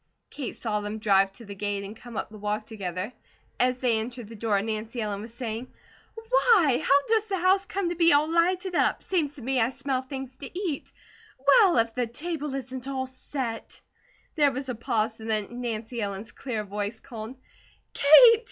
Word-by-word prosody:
Kate 270 -5 -5
saw 210 -3 -2
them 210 +1 -4
drive 195 -3 +3
to 225 +4 -13
the 200 - -7
gate 200 0 -2
and 200 +2 -8
come 235 -1 -10
up - - -4
the 215 - -10
walk 210 +1 -2
together. 195 0 -5 0.5
As 250 0 +3
they 245 -3 +2
entered 235 0 -6
the 230 - -9
door 210 -2 +1
Nancy 220 +3 -3
Ellen 205 -2 -2
was 225 +2 -8
saying: 240 0 -5 0.4
"Why, 450 - +3
how 280 0 +4
does 445 -1 +2
the 390 -2 -1
house 375 +2 +3
come 380 -2 -1
to 350 - -2
be 335 0 +5
all 290 +1 +4
lighted 355 +3 +1
up? - - +1
Seems 315 -6 0
to 265 - -10
me 260 0 +1
I 225 - +3
smell 265 0 -2
things 265 -1 -7
to 275 - -8
eat. 345 -8 -3 0.5
Well, 405 - +5
if 230 0 +2
the 245 -1 -1
table 295 +2 -4
isn't 260 -1 -6
all 265 -1 -2
set!" 255 -2 -5 0.5
There 295 -2 +4
was 265 +1 -5
a - - -1
pause 225 -1 -1
and 220 0 -7
then 220 +3 -1
Nancy 230 0 -3
Ellen's 200 +1 -4
clear 230 -5 -4
voice 205 +2 -4
called: 225 +1 -8 0.6
"Kate! 445 +11 +8
245 Hz, 195 wpm, -27 LUFS, 220-290 Hz, 0.6 s, Kate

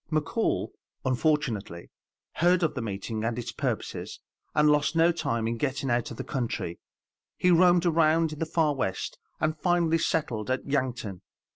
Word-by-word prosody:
McCall, 155 -1 0 0.4
unfortunately, 125 - 0 0.5
heard 175 +1 +4
of 160 - +1
the 130 - -3
meeting 110 +1 -4
and 115 +1 -1
its 120 -1 -4
purposes, - - -3 0.4
and 150 0 +5
lost 150 +2 +3
no 165 +1 +5
time 115 -8 -1
in 115 0 -2
getting 135 +2 -1
out 120 -1 +1
of 120 - -8
the - - -4
country. 115 -9 -3 0.6
He 180 - +3
roamed 175 0 +5
around 160 -1 +3
in 150 - -9
the 165 - -1
far 160 -2 +2
West, 125 -9 -3 0.2
and 155 0 +1
finally 170 0 +2
settled 125 -10 -1
at 130 0 -1
Yankton. 125 -9 -2
145 Hz, 160 wpm, -27 LUFS, 115-165 Hz, 0.6 s, and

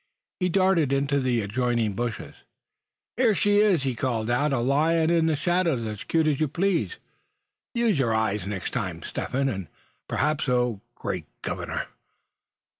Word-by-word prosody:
He 180 -1 +1
darted 185 -6 +3
into 140 +1 +1
the 125 -3 +1
adjoining 115 0 0
bushes. 115 +1 -4 0.8
"Here 230 -4 +4
she 205 +1 +3
is!" 195 -9 +4
he 135 -2 0
called 120 -2 -1
out, 125 +4 +2
"and 120 -2 0
alyin' 160 +4 +3
in 165 -1 +3
the 160 - +2
shadows, 165 -5 +1
as 105 -1 -5
cute 165 -1 +1
as 150 -3 +1
you 155 - +2
please. 190 - 0 0.8
Use 230 -9 +2
your 120 -4 +2
eyes 105 -3 0
next 100 -2 -4
time, 95 -9 -3
Step - - -5
Hen, 135 +1 +2
and 95 -9 -3 0.4
p'raps 150 -2 0
oh! 125 -4 +1
great - - -4 0.2
governor!" - - -3
135 Hz, 160 wpm, -26 LUFS, 115-165 Hz, 0.8 s, Here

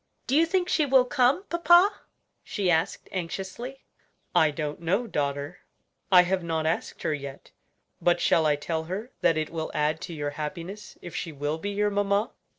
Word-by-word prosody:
"Do 265 - 0
you 330 +2 +5
think 360 +1 +1
she 315 - +2
will 260 -1 +5
come, 255 +7 +2
papa?" 345 +2 +5 0.5
she 195 -4 0
asked 160 0 0
anxiously. 195 +9 -5 0.5
"I 155 - +5
don't 150 0 -4
know, 185 +8 0
daughter; 145 -6 -3 0.5
I 180 -1 +8
have 185 0 -1
not 160 -1 -1
asked 160 +2 -2
her 160 - +1
yet. 140 -2 -7 0.5
But 175 0 +3
shall 160 -2 +3
I 150 - +3
tell 160 +2 -3
her 200 +8 -5
that 165 - +3
it 155 0 -2
will 160 -1 -3
add 150 +1 +1
to 175 - -6
your 145 -1 -3
happiness 170 +7 -6
if 175 - -8
she 170 - -3
will 145 +2 -3
be 205 - -3
your 205 +1 0
mamma?" 200 +2 +1
175 Hz, 180 wpm, -27 LUFS, 155-210 Hz, 0.5 s, I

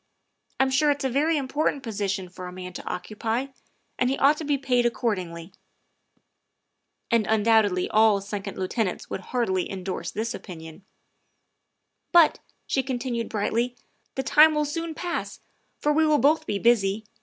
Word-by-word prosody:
I - - +6
'm 265 - 0
sure 295 +3 +3
it 285 -1 0
's - - -1
a 265 - 0
very 305 +5 +2
important 280 0 -1
posi 210 -4 -3
tion 190 -1 -2
for 180 0 -9
a - - -7
man 180 0 -8
to - - -8
occupy, 225 +7 -3 0.5
and 250 - +2
he 270 - 0
ought 285 +2 +5
to 320 - -5
be 290 -1 +1
paid 255 -3 +1
accord 235 -3 0
ingly." 170 0 -8 1.6
And 230 -3 +2
undoubtedly 215 -4 +3
all 215 -1 +4
second 200 0 -6
lieutenants 190 +1 -2
would - - -3
heartily 205 -8 0
endorse 190 -1 -4
this 225 +2 -3
opinion. 165 0 -10 0.6
" - - -53
But," 340 -3 +6 0.3
she 270 - 0
continued 245 -3 -3
brightly, 235 +3 -1 0.2
" - - -45
the 265 - -1
time 305 +3 +6
will 300 0 +1
soon 330 +2 -4
pass, 345 +1 -4 0.4
for 295 - +1
we 315 +1 +3
will 305 -1 +4
both 300 +3 +3
be 205 - -1
busy. 215 -2 +2
235 Hz, 175 wpm, -25 LUFS, 195-275 Hz, 1.6 s, I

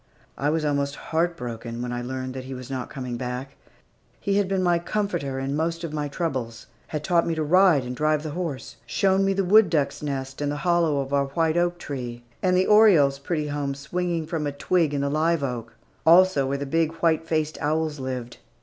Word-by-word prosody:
I 145 +3 0
was 155 0 0
almost 140 -1 0
heart 170 +3 -1
broken 115 -1 -6
when 125 - -4
I 120 0 -3
learned 130 +1 -4
that 130 0 -6
he 130 0 -6
was 130 +1 -8
not 130 -2 -4
coming 125 -3 -5
back. 125 +2 -5 0.6
He 200 0 0
had 200 -2 +2
been 190 -1 0
my 175 -1 +3
comforter 175 -8 -2
in 135 +1 -2
most 165 +2 -1
of 160 -2 -4
my 150 -1 -2
troubles, 130 -7 -3 0.2
had 150 -1 -4
taught 170 +1 +2
me 165 - 0
to 160 - -1
ride 175 -2 +5
and 125 0 -5
drive 155 +1 +1
the 155 - -4
horse, 155 -6 -5
shown 195 0 +2
me 195 0 +2
the 195 0 0
wood 210 +1 +6
duck's 150 -4 0
nest 135 -2 -4
in 145 - 0
the 145 - -2
hollow 170 -5 +2
of 135 +1 -6
our 140 0 +3
white 160 +3 0
oak 175 0 +1
tree, 125 -7 -6 0.2
and 180 -1 +3
the 185 - +3
orioles' 180 -11 +5
pretty 150 0 -2
home 145 -1 -2
swinging 170 +3 -2
from 155 -2 -2
a - - -1
twig 155 +1 +1
in 140 - 0
the 140 - 0
live 160 +1 +1
oak, 120 -4 -4 0.3
also 170 -4 +5
where 140 +1 -1
the 140 - -4
big 160 +3 +1
white 165 -1 +1
faced 155 -1 -1
owls 155 0 0
lived. 130 -2 -5
150 Hz, 220 wpm, -25 LUFS, 135-170 Hz, 0.6 s, wood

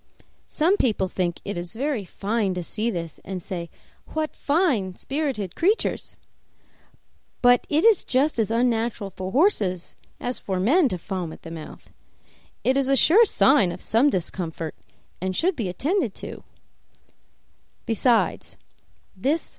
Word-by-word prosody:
Some 345 +6 +2
people 215 - +1
think 175 -2 -2
it 200 -2 -3 0.2
very 255 -3 -2
fine 200 +1 -1
to 180 - -3
see 220 +6 -2
this, 170 -6 -5
and 190 0 -5
say, 170 -3 -5 0.5
"What 310 -1 -2
fine 280 - +1
spirited 270 - -3
creatures!" 405 +7 0 1.3
But 245 0 +5
it 310 +6 +2
is 450 -5 +5
just 270 0 +1
as 220 - +1
unnatural 230 -3 0
for 185 0 -6
horses 205 - +1 0.2
as 245 +1 -2
for 190 -2 -3
men 275 - +4
to 185 - -2
foam 180 -2 -4
at - - -12
the 165 - -8
mouth; 160 -2 -10 0.7
it 260 +2 +2
is 270 -1 +1
a 275 - +4
sure 395 - +6
sign 270 - +4
of 175 - -7
some 235 +10 +3
discomfort, 165 - -3 0.5
and 185 0 -2
should 355 - +1
be 220 -9 -2
attended 320 - -1
to. - - -8
225 Hz, 135 wpm, -24 LUFS, 185-290 Hz, 1.3 s, sure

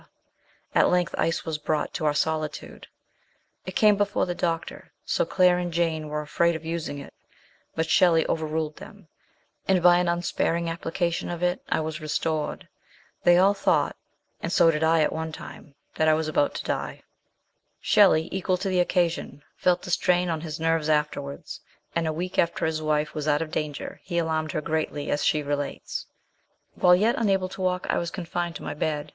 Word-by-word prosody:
At - - +4
length 180 -1 +1
ice 165 - 0
was 160 -2 -3
brought 150 0 -1
to 160 - -3
our 150 -1 +2
solitude; 155 0 -2 0.8
it - - -6
came 210 -2 +5
before 205 0 +1
the 180 - -2
doctor, 165 -2 -3
so - - +1
Claire 180 -1 +4
and 175 -1 -3
Jane 165 -2 0
were 150 0 -3
afraid 170 +3 +1
of 160 0 -7
using 165 -3 -3
it; 140 - -10 0.6
but 160 0 0
Shelley 165 -1 +4
over 160 -1 -1
ruled 155 0 -3
them, 205 -6 -13 0.6
and, 185 -2 +3
by 175 0 +7
an 180 - 0
unsparing 170 -1 0
appli 165 0 -4
cation 170 -2 -1
of 175 0 -4
it, 180 0 +1
I - - +1
was 155 0 -4
restored. 155 0 -2 0.6
They 175 0 +7
all 195 +3 +5
thought, 200 - +1 0.5
and - - -3
so 165 - +5
did 155 0 -1
I 160 0 +4
at - - 0
one 160 0 -3
time, 145 -2 -11 0.2
that 155 - +2
I 155 - +5
was 160 0 -1
about 145 -2 +1
to - - -4
die." - - -3 0.8
Shelley, 160 +1 +4
equal 185 -1 0
to 195 +2 -3
the 185 -1 +1
occasion, 175 -4 0
felt 180 -1 +1
the 180 - -6
strain 180 0 +2
on 160 -2 -2
his 155 -2 -6
nerves 165 -1 +1
afterwards, 150 - -2 0.3
and 165 -1 0
a - - +1
week 180 +4 -3
after 170 -1 +1
his 160 -1 -1
wife 150 -1 0
was 150 -1 -4
out 150 +1 +2
of 155 - -9
danger 150 -4 -4
he 175 -2 -4
alarmed 160 -2 -1
her 155 - -1
greatly, 155 -2 -2
as. 145 - 0
he 150 -1 +2
relates: 145 0 -4 0.3
" - - -45
While 180 0 +5
yet 215 +6 +3
unable 195 -4 +1
to 190 - -8
walk, 180 -1 0
I - - +1
was 170 - -3
confined 175 -1 -4
to - - -7
my - - -4
bed. 150 0 -2
165 Hz, 195 wpm, -26 LUFS, 155-175 Hz, 0.8 s, by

